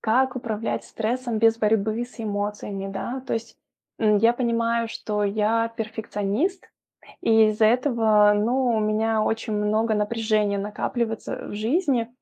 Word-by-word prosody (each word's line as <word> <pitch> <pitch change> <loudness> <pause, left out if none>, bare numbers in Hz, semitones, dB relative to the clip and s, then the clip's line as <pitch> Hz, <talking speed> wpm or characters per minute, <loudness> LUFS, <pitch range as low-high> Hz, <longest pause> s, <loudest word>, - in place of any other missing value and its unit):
Как 255 +3 +1
управлять 225 -2 -3
стрессом 235 +1 -2
без 225 0 +4
борьбы 220 +1 +1
с 245 -1 -13
эмоциями, 205 -2 -3
да? 250 +6 -4
То - - -3
есть, 225 0 -6 0.4
м, 210 -2 +3
я 230 +3 +4
понимаю, 235 -1 0
что 210 -2 -2
я 220 +3 +1
перфекционист, 220 - -2 0.5
и 220 -1 +5
из-за 215 +1 +2
этого, 220 -4 +4
ну, 245 +5 +1
у 230 -2 +2
меня 215 +1 +1
очень 220 +1 -1
много 215 +2 +1
напряжения 215 -1 0
накапливается, 220 +3 -3
э, - - -8
в - - -7
жизни, 245 - 0
225 Hz, 145 wpm, -24 LUFS, 210-235 Hz, 0.5 s, и